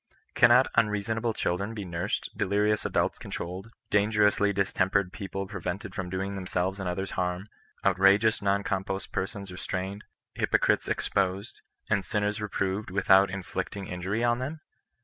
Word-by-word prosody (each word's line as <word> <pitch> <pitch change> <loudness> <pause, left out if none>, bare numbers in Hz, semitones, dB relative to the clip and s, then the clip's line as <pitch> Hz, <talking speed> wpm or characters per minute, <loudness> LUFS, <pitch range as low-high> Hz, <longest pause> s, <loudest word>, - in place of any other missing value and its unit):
Cannot - - +6
unreasonable 115 +1 +1
children 100 +6 -1
be 105 -3 -5
nursed, 85 +3 -3
delirious 105 +2 +1
adults - - 0
controlled, 90 +5 -6 0.2
dangerously 105 0 +3
distem 95 -1 +1
pered 95 -2 +1
people 95 -1 -5
prevented 95 -1 -5
from 95 -1 -4
doing 95 +2 -3
themselves 95 0 -2
and 95 -2 -2
others 95 +2 -3
harm, 90 +3 -2 0.4
outrageous 100 +3 +4
non 100 0 +1
compos 95 0 -2
persons 100 0 -4
restrained, 95 +2 -4 0.3
hypo - - +2
elites - - +1
exposed, 95 +1 -1 0.3
and 100 -3 +1
sinners 105 -1 -1
reproved 100 0 -2
without 95 +1 +5
vnflicting 95 +1 -4
injury 95 +6 -2
on 120 0 +2
them 150 +5 -4
100 Hz, 140 wpm, -28 LUFS, 95-105 Hz, 0.4 s, Cannot